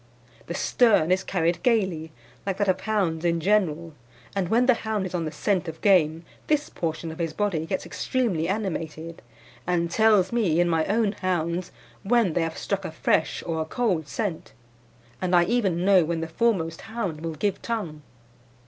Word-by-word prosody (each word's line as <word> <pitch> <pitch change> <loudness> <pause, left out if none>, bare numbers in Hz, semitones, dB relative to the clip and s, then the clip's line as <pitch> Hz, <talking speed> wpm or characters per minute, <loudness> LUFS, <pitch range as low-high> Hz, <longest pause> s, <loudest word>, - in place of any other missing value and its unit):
"The - - -4
stern 210 -9 +3
is 190 +1 +2
carried 175 -2 0
gaily, 190 - +1 0.3
like 195 -1 -2
that 205 - 0
of 185 0 +1
hounds 190 -7 0
in 170 -1 +1
general, 170 -4 +1 0.4
and 190 -3 -1
when 240 +3 +3
the 255 - +6
hound 220 -4 -2
is 185 - -6
on 170 -2 -1
the 155 - -3
scent 185 +3 0
of 160 0 -6
game 165 -5 +3 0.2
this 300 -1 +1
portion 165 0 -3
of 160 - -10
his 165 -2 -2
body 175 -6 -1
gets 190 +2 -2
extremely 215 -12 -1
animated, 165 -5 -4 0.5
and 170 -1 0
tells 210 -3 +4
me, 200 -9 +2
in 175 - +3
my 165 -2 +1
own 215 0 +2
hounds, 180 -2 -2 0.3
when 225 -4 +2
they 175 - +1
have 165 0 -3
struck 195 -1 -2
a 185 - -5
fresh 155 0 0
or 160 -1 -2
a - - -2
cold 180 - -1
scent, 200 -2 -4 0.7
and 185 -1 +1
I 175 - +6
even 190 -4 0
know 190 -3 +6
when 165 +1 -2
the 165 - -3
foremost 165 -3 0
hound 195 -9 -3
will 165 -1 -4
give 195 +5 -1
tongue. 190 -10 -4
180 Hz, 185 wpm, -25 LUFS, 165-205 Hz, 0.7 s, the